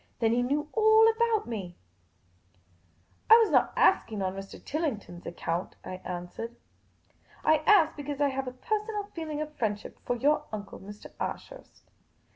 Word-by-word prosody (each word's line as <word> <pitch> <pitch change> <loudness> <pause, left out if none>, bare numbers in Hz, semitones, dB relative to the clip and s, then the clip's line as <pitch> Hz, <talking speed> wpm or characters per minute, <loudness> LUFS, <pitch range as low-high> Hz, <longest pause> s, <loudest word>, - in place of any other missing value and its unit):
Then 225 -1 +2
he 245 - +2
knew 290 +4 0
all 440 0 +6
about 450 -1 +1
me! 195 -7 -6 0.7
" 90 -1 -37
I 450 - +11
was 455 -2 +3
not - - +4
asking 220 - +3
on 185 0 -1
Mr. 195 0 -8
Tillington' 270 - -3
s - - -25
account," 175 +1 -3
I 185 - -5
answered. 180 +6 -6 0.3
' - - -38
' - - -27
I - - +5
asked 375 -8 +5
because 290 -1 -5
I 285 -1 +3
have 270 0 -3
a - - -3
personal 420 - -2
feeling 310 -2 -4
of 305 0 -6
friendship 210 -3 -3
for 245 - -1
your 285 +5 +2
uncle, 205 -2 -7
Mr. 205 +2 -11
Ashurst." - - -7
255 Hz, 170 wpm, -29 LUFS, 195-325 Hz, 0.7 s, I